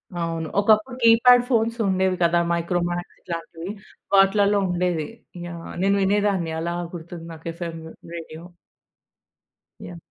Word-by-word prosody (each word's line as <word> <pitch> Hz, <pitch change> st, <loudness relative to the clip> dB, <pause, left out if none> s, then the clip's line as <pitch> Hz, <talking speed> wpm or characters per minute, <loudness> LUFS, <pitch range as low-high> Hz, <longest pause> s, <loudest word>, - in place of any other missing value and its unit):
అవును. 165 Hz, -2 st, -3 dB
ఒకప్పుడు 215 Hz, +4 st, +3 dB
keypad 240 Hz, +2 st, +7 dB
phones 230 Hz, -1 st, +1 dB
ఉండేవి 190 Hz, 0 st, +1 dB
కదా! 170 Hz, 0 st, +3 dB
మైక్రో 170 Hz, +1 st, 0 dB
మాక్స్ 175 Hz, 0 st, -5 dB
ఇట్లాంటివి 165 Hz, +1 st, -6 dB, 0.4 s
వాటిలల్లో 200 Hz, +1 st, +4 dB
ఉండేది. 175 Hz, -3 st, -1 dB, 0.4 s
యహ్! 170 Hz, -1 st, -8 dB
నేను 200 Hz, +1 st, +3 dB
వినేదాన్ని 195 Hz, -4 st, +1 dB
అలా 170 Hz, +1 st, -2 dB, 0.2 s
గుర్తుంది 170 Hz, 0 st, -8 dB
నాకు 160 Hz, +1 st, -11 dB
ఎఫ్ 170 Hz, -, -7 dB
ఎం 165 Hz, -, -8 dB, 0.4 s
రేడియో. 165 Hz, -1 st, -8 dB, 1.4 s
యాహ్! 175 Hz, -1 st, -9 dB
175 Hz, 125 wpm, -23 LUFS, 170-200 Hz, 1.4 s, keypad